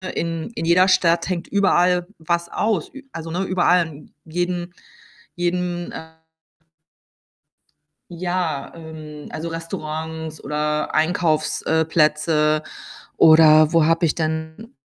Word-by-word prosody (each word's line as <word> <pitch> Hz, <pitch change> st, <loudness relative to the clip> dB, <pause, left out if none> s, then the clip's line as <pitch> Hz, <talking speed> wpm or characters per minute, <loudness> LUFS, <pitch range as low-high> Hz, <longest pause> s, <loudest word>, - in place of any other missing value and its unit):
in 165 Hz, +3 st, -3 dB
in 165 Hz, -, -3 dB
jeder 180 Hz, +3 st, +4 dB
Stadt 170 Hz, -1 st, +2 dB
hängt 175 Hz, -2 st, -3 dB
überall 180 Hz, -3 st, +2 dB
was 170 Hz, +1 st, -1 dB
aus. 210 Hz, -6 st, -1 dB
Ü 275 Hz, 0 st, -11 dB
also, 165 Hz, 0 st, -7 dB
ne, 180 Hz, +3 st, -1 dB
überall 180 Hz, -2 st, +2 dB
in 150 Hz, -1 st, -14 dB
jedem 175 Hz, +1 st, -3 dB, 0.6 s
jedem, 175 Hz, 0 st, -2 dB
äh 160 Hz, 0 st, -10 dB, 1.9 s
Ja, 175 Hz, -4 st, -3 dB
ähm, 155 Hz, -2 st, -10 dB
also, 160 Hz, +2 st, -5 dB
Restaurants 160 Hz, -1 st, -6 dB
oder 150 Hz, +1 st, -2 dB
Einkaufs, 155 Hz, -1 st, +1 dB
äh, 160 Hz, 0 st, +1 dB
Plätze 155 Hz, -1 st, +2 dB, 0.6 s
oder 155 Hz, -1 st, +6 dB
wo 165 Hz, -2 st, +4 dB
habe 165 Hz, +1 st, +2 dB
ich 150 Hz, -, 0 dB
denn 160 Hz, +7 st, -4 dB
165 Hz, 115 wpm, -21 LUFS, 155-175 Hz, 1.9 s, oder